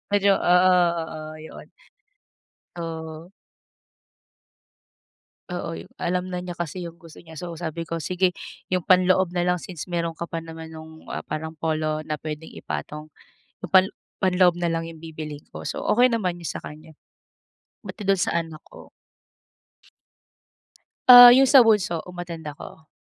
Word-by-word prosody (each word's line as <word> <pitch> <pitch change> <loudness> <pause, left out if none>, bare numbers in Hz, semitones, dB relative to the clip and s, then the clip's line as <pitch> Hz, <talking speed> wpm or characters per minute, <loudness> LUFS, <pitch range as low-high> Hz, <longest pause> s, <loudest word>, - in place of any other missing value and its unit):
Medyo 200 -1 +4
oo-oo, 170 -3 +2
yun. 160 - -12 1.1
Oo. 160 +1 -7 2.2
Oo, 175 -2 -5
yung - - -13
alam 180 +1 -2
na 180 -1 -5
niya 180 - -6
kasi 175 +1 -5
yung 170 +1 -9
gusto 165 0 -14
niya. 160 -2 -11
So, 170 -2 -6
sabi 165 0 -5
ko, 165 - -3
"Sige 180 +1 0 0.3
yung 185 -2 0
panloob 185 -1 +3
na 175 0 -1
lang, 180 0 +2
since 180 -2 -8
meron 170 -1 -2
ka 170 - -5
pa 165 0 -5
naman 160 0 -10
nung, 160 0 -12
ah, - - -5
parang 160 +1 -5
polo 155 -1 -2
na 155 -1 -4
pwedeng 155 +1 -7
ipatong. 150 0 -6 0.6
Yung 175 - -6
pan 190 0 +6 0.3
panloob 180 -2 +3
na 175 -1 -1
lang 165 0 -2
yung 165 -1 -11
bibilhin 155 -2 -8
ko." - - -8
So - - -4
okey 245 +3 +5
naman 185 -6 -1
yung 170 - -5
sa - - -5
kanya. 155 +1 -11 0.9
Buti 205 - -8
dun 195 -1 +4
sa 170 - 0
anak 160 -2 -8
ko - - -15 2.2
Ah, 245 -1 +12
yung 265 +2 +6
sa 265 -2 +8
bunso 190 -7 +2
um-attend 175 -2 -7
ako. 155 +1 -12
170 Hz, 150 wpm, -24 LUFS, 160-180 Hz, 2.2 s, Ah